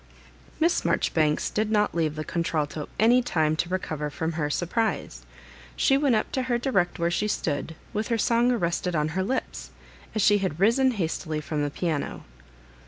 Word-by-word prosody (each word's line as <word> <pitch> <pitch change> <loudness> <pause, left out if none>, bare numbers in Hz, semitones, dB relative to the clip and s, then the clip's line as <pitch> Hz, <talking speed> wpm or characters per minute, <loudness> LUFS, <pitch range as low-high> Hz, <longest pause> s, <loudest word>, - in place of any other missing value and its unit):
Miss 335 +2 +2
Marjobibanes 155 -2 +1
did 215 0 0
not 210 -1 +2
leave 160 -3 0
the 155 - -3
contral 165 -3 0
to 150 -2 -6
any 240 +4 +5
time 155 -9 +1
to 170 - -1
recover 155 -5 -2
firom 160 +3 -3
her 150 -2 -1
surprise; 215 +9 -2 0.5
she 270 - +3
went 275 -3 +3
up 215 - -1
to 260 - 0
her 240 - +3
direct 200 -8 0
where 170 0 0
she 210 +4 0
stood, 160 -5 -2 0.2
with 215 +1 -1
her 230 - +1
song 235 +2 +3
arrested 180 -5 -1
on 150 0 +1
her 180 +4 -1
lips, 255 +7 -3 0.5
as 215 - +2
she 205 -1 +5
had 185 -5 -2
risen 235 +7 +4
hastily 160 -5 -2
from 150 0 -3
the 145 - 0
piano. 155 -1 -3
180 Hz, 180 wpm, -26 LUFS, 155-225 Hz, 0.5 s, any